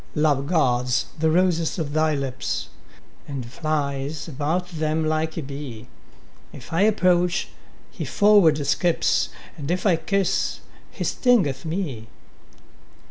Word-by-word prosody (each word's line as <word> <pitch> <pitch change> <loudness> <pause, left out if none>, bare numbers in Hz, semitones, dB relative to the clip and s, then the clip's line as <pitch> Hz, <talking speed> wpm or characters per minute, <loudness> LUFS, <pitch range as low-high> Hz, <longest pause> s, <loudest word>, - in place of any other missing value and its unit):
Love 145 -3 +2
guards 125 -7 +2
the 160 0 +3
roses 170 -1 +2
of 150 -4 -3
thy 155 0 +2
lips, 135 -2 -3 0.6
And 135 -4 -5
flies 140 +2 -3
about 160 +5 -1
them 160 -1 -1
like 155 0 -1
a 165 - -2
bee: 135 -4 -8 0.6
If 125 - -11
I 165 - +2
approach, 180 -4 +2 0.4
he - - -6
forward 205 -7 +5
skips, 170 +4 +2 0.3
And 145 0 -5
if 180 +3 -1
I 180 -5 +4
kiss, 195 +4 0 0.3
he - - -6
stingeth 190 - +2
me. 155 - -3
155 Hz, 125 wpm, -23 LUFS, 140-175 Hz, 0.6 s, forward